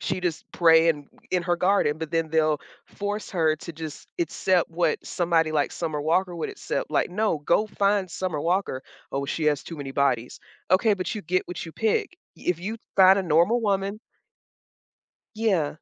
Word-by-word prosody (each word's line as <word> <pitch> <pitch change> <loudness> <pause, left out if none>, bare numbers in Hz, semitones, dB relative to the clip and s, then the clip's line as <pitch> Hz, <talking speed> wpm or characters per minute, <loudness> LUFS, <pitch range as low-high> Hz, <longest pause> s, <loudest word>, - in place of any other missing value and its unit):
she 185 - -2
just 175 -3 -2
praying 160 -3 +4 0.2
in 180 -1 +1
her 175 0 +1
garden, 180 -5 +2
but 160 -2 -5
then 165 -1 0
they'll 155 -2 +2 0.3
force 205 +1 -4
her 160 -4 +2
to 170 - -8
just 155 -2 -8
accept 175 +1 +1
what 165 -1 +1
somebody 165 -2 +1
like 150 -2 0
Summer 155 -3 -3
Walker 175 +4 +1
would 165 - -3
accept, - - -4
like, - - +1
"No, 210 -3 0
go 170 +8 +2
find 200 -2 +1
Summer 170 -3 -3
Walker." 170 -5 0 0.3
"Oh, 140 0 -2
she 155 +3 -2
has 145 -2 +2
too 165 - -8
many 140 -2 -6
bodies." 125 -4 0 0.3
"Okay, 210 +4 +4
but 185 +3 -3
you 210 - -5
get 185 +3 -1
what 180 - -5
you 165 - -9
pick." 370 - 0 0.2
If 180 -2 -2
you 215 +5 -4 0.2
find 190 +1 +7
a - - 0
normal 175 +8 +3
woman 200 -1 0 1.4
Yeah. 195 -9 +1
170 Hz, 180 wpm, -25 LUFS, 155-195 Hz, 1.4 s, find